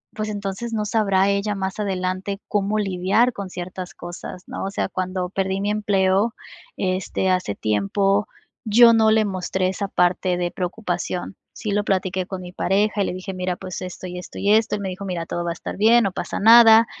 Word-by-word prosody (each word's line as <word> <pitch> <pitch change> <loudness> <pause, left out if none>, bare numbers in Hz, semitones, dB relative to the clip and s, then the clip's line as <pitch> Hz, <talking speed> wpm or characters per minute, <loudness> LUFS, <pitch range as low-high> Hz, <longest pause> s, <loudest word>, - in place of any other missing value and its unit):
pues, 215 0 -3
entonces 205 +3 -4
no 215 -1 -1
sabrá 200 -3 +2
ella 200 +1 0
más 190 +1 -4
adelante 190 0 -2
cómo 205 +1 0
lidiar 195 +5 +1
con 200 -3 -6
ciertas 180 +1 -7
cosas, 175 +1 -8
¿no? - - -5
O 195 - -3
sea, - - -1
cuando 185 -1 -3
perdí 190 0 -1
mi 205 - -1
empleo, 205 0 +1 0.4
este, 185 0 -1
hace 180 - 0
tiempo, 195 - +1 0.4
yo 230 +1 +7
no 220 -1 +4
le 220 0 +3
mostré 185 -1 -1
esa 195 +2 -2
parte 180 0 +1
de 175 0 -1
preocupación. 180 -1 -3 0.2
Sí 210 - -4
lo 205 +1 +1
platiqué 185 -2 -1
con 190 -1 -6
mi 180 -1 -9
pareja 200 +3 +1
y - - +2
le - - -3
dije: 185 +1 -6
"Mira, 180 0 -2
pues 185 -1 -7
esto 185 0 -7
y 180 - -7
esto 180 - -10
y 200 - +1
esto", 220 0 +3
el 205 - -5
me 195 - -3
dijo: 190 +2 -6
"Mira, 175 -3 -3
todo 175 - -3
va 170 - -2
a - - -2
estar 170 - -7
bien, 230 +3 +5
no 195 - 0
pasa - - -4
nada, 225 +1 +8
195 Hz, 205 wpm, -22 LUFS, 185-210 Hz, 0.4 s, nada